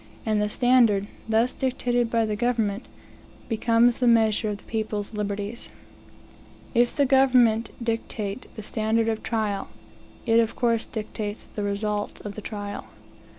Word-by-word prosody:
And 215 -2 +1
the 210 - 0
standard, 230 -4 +3 0.2
thus 225 +3 +2
dictated 245 -2 0
by 230 -1 +2
the 215 -1 -1
government, 225 -1 0 0.6
becomes 230 +1 +3
the 250 - +2
measure 220 -2 +3
of 205 - -3
the - - -20
people's 215 -2 -3
liberties. 205 +2 -4 1.0
If 240 -1 +3
the 285 - +3
government 250 -4 +4
dictate 225 -1 -3
the 215 - -7
standard 220 +2 0
of 220 -1 -1
trial, 215 -4 -2 0.6
it 230 -1 +4
of 225 -1 +1
course 230 -2 +1
dictates 215 -1 -5
the 210 - -4
results 205 +1 -2
of 205 - -6
the 215 - -7
trial. 205 -1 -6
220 Hz, 145 wpm, -25 LUFS, 210-235 Hz, 1.0 s, government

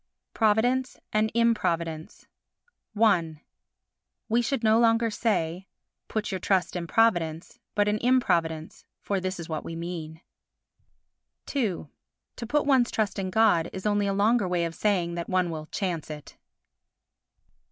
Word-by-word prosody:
Providence 240 +4 +2 0.2
and 215 +1 +2
Improvidence 170 -9 0 0.7
i 170 -9 +2 0.9
We 235 +2 +3
should 240 0 -2
no 220 +1 +4
longer 230 -1 +3
say: 190 -5 -1 0.4
Put 215 -1 -3
your 190 - -2
trust 185 -2 0
in 170 -1 -3
Providence, 175 -3 +1 0.2
but 205 -1 +2
in 210 +1 +1
Improvidence, 170 -11 0 0.2
for 200 -1 -1
this 185 0 -4
is 170 - -6
what 155 -2 -4
we 165 - -6
mean. 165 -1 -6 1.3
ii 215 - -1 0.5
To 235 - -6
put 295 +4 +1
one's 260 -4 +3
trust 215 -2 -1
in 190 -1 -2
God 185 -5 +3
is 190 - -7
only 205 -1 +1
a - - +1
longer 205 +1 +2
way 175 -1 0
of 165 - -4
saying 180 -3 0
that 170 0 -5
one 185 -2 +1
will 155 -1 -6
chance 175 -6 -3
it. 150 -1 -9
195 Hz, 140 wpm, -26 LUFS, 170-225 Hz, 1.3 s, no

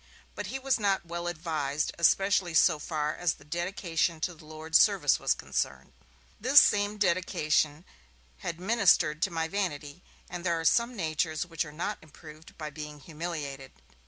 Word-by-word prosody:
But - - -5
he 270 - -4
was 270 -2 0
not 195 -4 +1
well 170 +1 -5
advised 155 -4 -2
especially 185 0 +3
so 155 -1 +5
far 150 0 -2
as 175 -3 0
the - - -18
'dedication 170 0 -1
to 175 - -1
the 155 -1 -16
Lord's 155 +1 +1
service' 190 -10 +4
was - - +1
concerned. - - -4 0.5
This 260 +6 +7
same 205 -3 +2
'dedication' 170 -4 +1 0.5
had 170 - -5
ministered 180 -7 +3
to 195 - +2
my 165 -2 -2
vanity, 170 -4 -4 0.3
and 175 -1 -7
there 170 -2 0
are 165 - -5
some 235 +7 +3
natures 160 -3 -1
which 165 -3 -2
are 150 - -10
not 175 +7 -4
improved 155 +1 -14
by 155 -2 -6
being 150 0 -8
humiliated. 150 -4 -6
165 Hz, 160 wpm, -29 LUFS, 155-185 Hz, 0.5 s, This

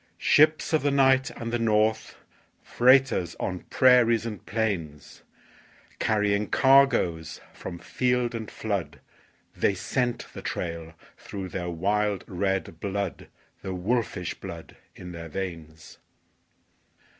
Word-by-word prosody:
Ships 155 +2 +3
of 155 - +3
the 145 - +1
night 135 -1 +3
and 115 0 -6
the 120 - +1
north, 110 0 +1 0.5
Freighters 130 -8 +3
on 90 -2 -3
prairies 120 -3 +4
and 110 -3 -6
plains, 85 -10 -3 0.8
Carrying 105 -1 +1
cargoes 120 - +3
from 85 - -7
field 125 +4 0
and 110 -2 -5
flood 90 -10 -4 0.6
They 100 - +1
scent 120 +5 -2
the - - -8
trail 85 -1 -5 0.2
through 95 -2 -7
their 90 -1 -4
wild 100 +4 0
red 95 -3 -2
blood, 100 -1 -4 0.3
The 95 -1 -5
wolfish 100 -2 -1
blood - - -10 0.2
in 90 -1 -9
their 85 -1 -8
veins. 80 -3 -7
100 Hz, 115 wpm, -26 LUFS, 90-120 Hz, 0.8 s, prairies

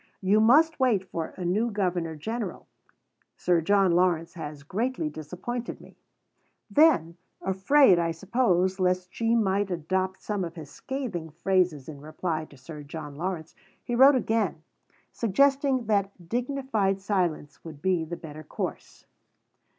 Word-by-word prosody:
"You 200 +3 +3
must 295 +8 +5
wait 220 -8 +2
for 165 -2 -5
a 180 - -4
new 210 +7 +1
Governor 180 -6 -1
General. 215 +4 -5 0.7
Sir 175 -2 +2
John 195 +2 +3
Lawrence 170 -2 +2
has 150 -4 -7
greatly 205 - -2
disappointed 180 +11 -6
me." - - -16 0.8
Then, 235 - +4 0.2
afraid, 190 +2 +4
I 170 -1 +1
suppose, 190 +1 +1
lest 180 0 0
she 230 0 +1
might 200 -2 +1
adopt 185 +2 -2
some 205 -3 -2
of 170 -1 -6
his 155 -4 -9
scathing 235 - -5
phrases 170 -3 0
in 145 -3 -9
replying 155 +1 -3
to 140 - -17
Sir 150 +3 -9
John 145 0 -8
Lawrence, 165 0 -4 0.3
he 240 - -4
wrote 265 +3 +7
again, 220 -9 0 0.5
suggesting 270 +3 +2
that 200 -4 -1
dignified 240 -5 0
silence 180 -7 -2
would 155 -3 -10
be 180 0 +1
the 170 +2 -6
better 155 -1 -9
course. - - -6
185 Hz, 140 wpm, -27 LUFS, 165-225 Hz, 0.8 s, wrote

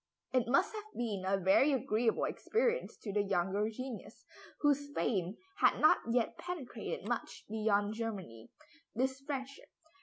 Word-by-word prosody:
It 250 -3 +3
must 355 - +3
have 430 0 -8
been 210 -6 -2
a 195 +1 +3
very 195 +10 +5
agreeable 225 -2 +1
experience 480 +2 0
to 205 - -4
the 205 - +3
younger 195 +2 +1
genius, 250 +1 -7 0.4
whose 285 -1 +2
fame 190 -2 0 0.2
had - - +4
not 310 - +6
yet 235 -1 +1
penetrated 270 - -5
much 240 0 -3
beyond 210 -1 +1
Germany, 195 - -5 0.5
this 265 +3 0
friendship. 275 -1 -5
230 Hz, 140 wpm, -34 LUFS, 205-275 Hz, 0.5 s, not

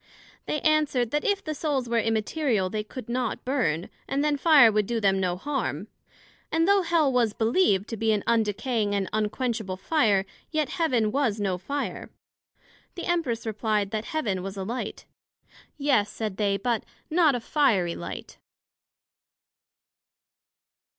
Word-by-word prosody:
They 300 - -1
answered, 295 -6 +2
That 295 0 0
if 400 -1 0
the 310 - -3
Souls 285 -5 -1
were 235 0 +1
immaterial, 225 - 0
they 215 -1 -2
could 220 +2 -9
not 245 -1 -2
burn, 195 - 0 0.2
and 280 +1 0
then 300 -1 +2
fire 285 -6 +6
would 210 -1 +1
do 235 -1 -1
them 195 -2 +2
no 180 -1 0
harm; 285 +7 -3 0.6
and 325 +1 +2
though 400 0 +5
Hell 330 -6 +2
was 235 -4 +2
believed 220 - +2
to 225 - -4
be 225 +1 +1
an 210 -2 0
undecaying 220 -1 0
and 195 -1 -1
unquenchable 215 -2 -1
fire, 205 - +2 0.2
yet 310 -3 0
Heaven 250 -11 +1
was 235 -5 0
no 190 -3 -1
fire. 280 +11 -4 0.9
The 350 - -5
Empress 310 -11 -1
replied, 210 -2 -1
That 220 0 -3
Heaven 215 -12 -2
was 195 +1 -6
a 190 - -3
Light. 225 +1 -5 0.7
Yes, 270 -8 +2
said 215 -3 -4
they, 200 -2 +1
but 235 0 -1 0.3
not 315 -4 +4
a - - -1
fiery 225 - +2
Light. - - -8
230 Hz, 150 wpm, -26 LUFS, 205-290 Hz, 0.9 s, fire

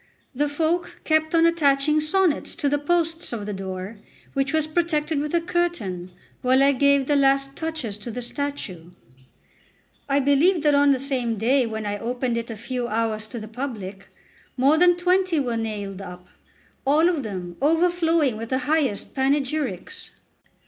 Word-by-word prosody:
The 290 +3 0
folk 320 +4 -1
kept 315 +1 +1
on 330 0 +5
attaching 300 -2 +3
sonnets 335 +1 +1
to 290 - -1
the 290 +1 +1
posts 330 +2 0
of 215 -3 -4
the 210 - -4
door, 190 +2 -6 0.4
which 275 0 0
was 315 -1 +1
protected 310 -2 0
with 295 +1 -3
a 340 - +3
curtain 330 - -2 0.3
while 260 +2 +4
I 280 - +5
gave 280 0 +3
the 290 - +1
last 275 0 +2
touches 315 -10 -4
to 210 +3 -8
the 245 +2 -5
statue. 240 - -5 1.2
I 275 +1 +3
believe 290 +5 +3
that 295 -1 +4
on 285 0 +5
the 265 - +2
same 250 -4 -2
day 250 +4 +2
when 220 -1 -4
I 205 0 -3
opened 245 +1 -2
it 235 0 -3
a 225 - -6
few 240 +2 -3
hours 220 -1 -1
to 235 +1 -7
the 215 - -8
public, 215 -6 -6 0.5
more 275 +4 +4
than 355 0 +5
twenty 365 -1 +2
were 245 -4 -1
nailed 205 -4 -4
up, 180 -1 -10 0.6
all 300 +5 +4
of 340 -5 +1
them 185 -6 -6
overflowing 325 -4 +2
with 230 +1 -6
the 260 - +1
highest 290 -9 0
panegyrics. 275 - -1
275 Hz, 170 wpm, -24 LUFS, 225-315 Hz, 1.2 s, on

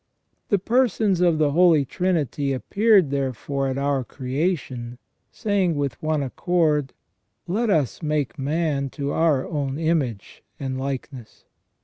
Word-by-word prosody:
The 200 - +4
Persons 215 -3 +1
of 170 -3 +3
the 150 -2 +2
Holy 165 -3 +5
Trinity 145 -5 -1
appeared 200 - +3
therefore 135 0 -2
at 130 0 -2
our 140 -1 0
creation, 130 -3 -3 0.3
saying 195 -5 0
with 140 -2 -3
one 155 -2 0
accord: 150 0 0 0.3
" - - -48
Let 235 -1 +1
us 155 - +1
make 150 -2 -1
man 145 -1 -1
to 140 -1 -2
our 155 -5 +2
own 140 -3 -2
image 155 -10 -2 0.2
and 130 -1 -3
likeness 130 -3 -6
145 Hz, 130 wpm, -23 LUFS, 135-170 Hz, 0.3 s, Holy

